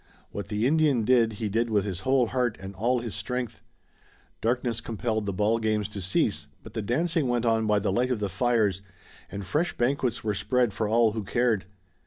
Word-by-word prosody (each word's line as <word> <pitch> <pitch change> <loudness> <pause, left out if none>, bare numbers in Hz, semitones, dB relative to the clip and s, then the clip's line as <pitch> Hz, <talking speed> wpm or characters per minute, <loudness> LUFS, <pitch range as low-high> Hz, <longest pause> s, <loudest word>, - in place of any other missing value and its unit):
What 100 - -5
the 105 +1 -1
Indian 145 -4 +3
did 115 -2 +4
he 105 +1 -3
did 115 +3 0
with 105 -2 +1
his 95 -4 -3
whole 130 +5 +3
heart, 125 -1 -1
and 95 +1 -8
all 120 +6 +1
his 115 -4 -5
strength. 120 +4 -4 0.8
Darkness 120 0 0
compelled 110 -2 -2
the - - 0
ball 105 +4 +1
games 110 -2 0
to 105 -1 -6
cease, 95 +1 0 0.2
but - - -11
the 110 - -2
dancing 155 +7 0
went 120 -1 0
on 110 -1 +2
by 105 -1 +3
the 100 - 0
light 125 +6 +1
of 125 -4 0
the 105 - -1
fires 110 -4 +1 0.5
and 100 +1 -6
fresh 155 - -1
banquets 125 -1 0
were 105 -1 0
spread 120 +1 +1
for 110 +1 -1
all 115 +1 +4
who 110 0 -4
cared. 115 -1 +1
115 Hz, 205 wpm, -27 LUFS, 105-125 Hz, 0.8 s, did